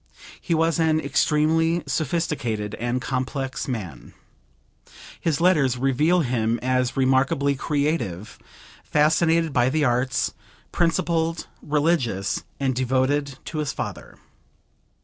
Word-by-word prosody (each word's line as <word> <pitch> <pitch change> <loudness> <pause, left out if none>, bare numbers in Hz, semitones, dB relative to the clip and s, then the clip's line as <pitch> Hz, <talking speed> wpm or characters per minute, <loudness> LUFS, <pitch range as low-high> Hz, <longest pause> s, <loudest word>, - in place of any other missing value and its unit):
He 170 - 0
was 165 +1 +1
an 160 -1 +3
extremely 160 +3 +1
sophisticated 130 -7 -2
and 120 +2 -1
complex 135 +1 -3
man. 95 - -6 1.0
His 160 -4 0
letters 150 -8 +3
reveal 150 +7 +2
him 120 -4 0
as 130 0 0
remarkably 135 +1 +2
creative, 140 - -2 0.4
fascinated 160 +1 +2
by 125 0 +3
the 150 +1 +1
arts, 125 +1 0 0.4
principled, 165 -1 0 0.2
religious 145 - 0 0.2
and 135 -2 0
devoted 130 +2 0
to 155 - -4
his 150 -3 -2
father. - - -6
140 Hz, 105 wpm, -23 LUFS, 125-160 Hz, 1.0 s, an